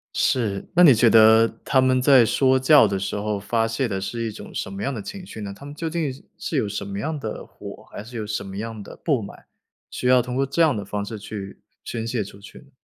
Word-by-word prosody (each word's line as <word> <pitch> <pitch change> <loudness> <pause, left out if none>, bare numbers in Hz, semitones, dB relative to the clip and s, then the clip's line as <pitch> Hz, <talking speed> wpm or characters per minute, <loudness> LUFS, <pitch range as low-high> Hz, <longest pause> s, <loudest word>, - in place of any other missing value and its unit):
是， 115 -10 0
那 180 - +5
你 145 -6 +9
觉 115 +1 +4
得 110 +1 +7 0.2
他 130 - +2
们 130 0 +2
在 130 -2 +6
说 130 +3 +3
教 135 -3 +6
的 100 -1 -2
时 95 - -3
候 105 0 -2
发 115 +3 0
泄 115 +3 -1
的 95 -2 -3
是 115 +4 -4
一 110 - -3
种 - - -11
什 - - -4
么 100 - -6
样 140 - -1
的 110 - -5
情 195 - -8
绪 110 - -10
呢？ 100 -1 -5
他 140 - -13
们 145 - -9
究 165 +2 -4
竟 160 -4 -2 0.3
是 155 - -3
有 110 - +1
什 105 - -4
么 100 0 -6
样 155 +4 -3
的 - - -6
火， - - -11
还 - - -7
是 120 +2 -9
有 110 - -4
什 105 -1 -3
么 95 0 -8
样 110 0 -5
的 - - -11
不 140 -8 +2
满， 100 - -11 0.5
需 125 - -3
要 130 0 +6
通 125 +1 -5
过 135 +1 +1
这 165 +5 0
样 155 -6 +3
的 100 - -4
方 100 +1 -4
式 110 0 -7
去 100 -2 -8 0.2
宣 115 -1 -4
泄 115 -3 -1
出 100 +1 -12
去？ 135 +7 -15
115 Hz, 280 characters per minute, -23 LUFS, 105-130 Hz, 0.5 s, 你